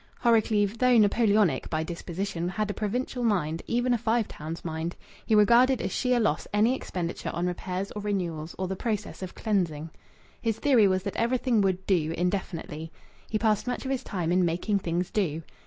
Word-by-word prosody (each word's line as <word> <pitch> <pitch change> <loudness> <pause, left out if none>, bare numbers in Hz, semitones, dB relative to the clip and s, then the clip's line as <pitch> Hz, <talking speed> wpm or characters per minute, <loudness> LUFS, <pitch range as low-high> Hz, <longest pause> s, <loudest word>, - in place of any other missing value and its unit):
Horrocleave, 220 -2 +3
though 250 -1 +5
Napoleonic 205 - +3
by 160 -1 -1
disposition, 175 +1 -4
had 210 +2 -2
a - - -5
provincial 245 +4 -2
mind, 170 -8 0
even 245 +1 +1
a 240 - +1
Five 230 0 +1
Towns 160 +3 -7
mind. 160 +1 -3 0.3
He 220 - +4
regarded 240 +5 +5
as - - -2
sheer 250 -2 +1
loss 210 -9 0
any 215 +4 +3
expenditure 175 -9 -4
on 175 +2 -1
repairs 180 +2 -3
or 210 - -5
renewals 175 -6 -3
or 185 - -2
the 190 - -3
processes 210 -1 -3
of 185 -1 -6
cleansing. 165 -7 -1 0.5
His 225 -2 0
theory 250 -8 +4
was 185 -1 +1
that 200 - -4
everything 235 -1 +2
would 190 -1 0
"do" 165 -4 +1
indefinitely. 170 -3 -3 0.4
He 215 - 0
passed 215 +1 +1
much 250 - -3
of 265 - -2
his 265 - -1
time 175 -4 -2
in 180 +1 +3
making 180 +5 0
things 175 0 -2
"do." 165 -6 -1
200 Hz, 185 wpm, -27 LUFS, 175-225 Hz, 0.5 s, though